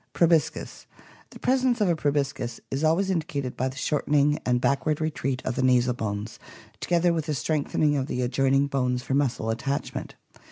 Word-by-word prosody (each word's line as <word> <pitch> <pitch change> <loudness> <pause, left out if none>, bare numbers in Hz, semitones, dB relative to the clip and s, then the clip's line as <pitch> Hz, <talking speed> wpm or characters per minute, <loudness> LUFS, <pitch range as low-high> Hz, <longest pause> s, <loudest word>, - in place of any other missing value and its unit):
Proboscis. 165 -2 +1 0.2
— - - -25
The - - -12
presence 255 -2 +1
of 210 - +3
a 170 - +2
proboscis 140 -5 -1
is 135 +3 -2
always 175 +5 +2
indicated 145 -7 -2
by 130 - -1
the 130 - -10
shortening 150 0 +1
and 125 0 +3
backward 145 +4 +1
retreat 135 -5 -2
of 130 - -1
the - - 0
nasal 125 -1 +3
bones, 105 -2 -4 0.4
together 175 0 +2
with 160 -1 -2
a 150 - 0
strengthening 150 0 0
of 135 -1 -1
the 125 -4 -2
adjoining 135 +2 +2
bones 125 -3 -1
for 135 - -3
muscle 130 -5 0
attachment. 135 +5 -3
140 Hz, 175 wpm, -26 LUFS, 125-155 Hz, 0.4 s, of